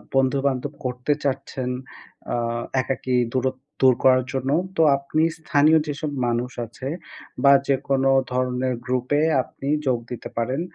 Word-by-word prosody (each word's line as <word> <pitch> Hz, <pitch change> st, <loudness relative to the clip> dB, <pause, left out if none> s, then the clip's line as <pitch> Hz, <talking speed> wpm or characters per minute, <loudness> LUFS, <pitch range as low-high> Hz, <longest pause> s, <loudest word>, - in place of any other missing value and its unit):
বন্ধুবান্ধব 135 Hz, +1 st, +1 dB
করতে 125 Hz, +3 st, 0 dB
চাচ্ছেন 130 Hz, -1 st, -2 dB, 0.6 s
আ -, -, +1 dB, 0.5 s
একাকী 130 Hz, -1 st, -2 dB, 0.2 s
দূরত্ব 130 Hz, 0 st, -1 dB, 0.2 s
দূর 130 Hz, -2 st, +6 dB
করার 130 Hz, -1 st, +5 dB
জন্য। 135 Hz, 0 st, -1 dB, 0.3 s
তো -, -, +4 dB, 0.2 s
আপনি 140 Hz, +3 st, 0 dB
স্থানীয় 155 Hz, 0 st, +4 dB
যেসব 150 Hz, +1 st, -3 dB, 0.2 s
মানুষ 120 Hz, +1 st, -1 dB
আছে 120 Hz, +3 st, -8 dB, 0.6 s
বা 140 Hz, -, +7 dB, 0.2 s
যেকোন 135 Hz, 0 st, +1 dB, 0.3 s
ধরনের 125 Hz, 0 st, 0 dB
গ্রুপে 130 Hz, +3 st, 0 dB, 0.2 s
আপনি 135 Hz, -, -9 dB, 0.2 s
যোগ 125 Hz, -2 st, +3 dB
দিতে 120 Hz, -, -6 dB
পারেন। 130 Hz, +6 st, -1 dB
130 Hz, 130 wpm, -23 LUFS, 125-140 Hz, 0.6 s, বা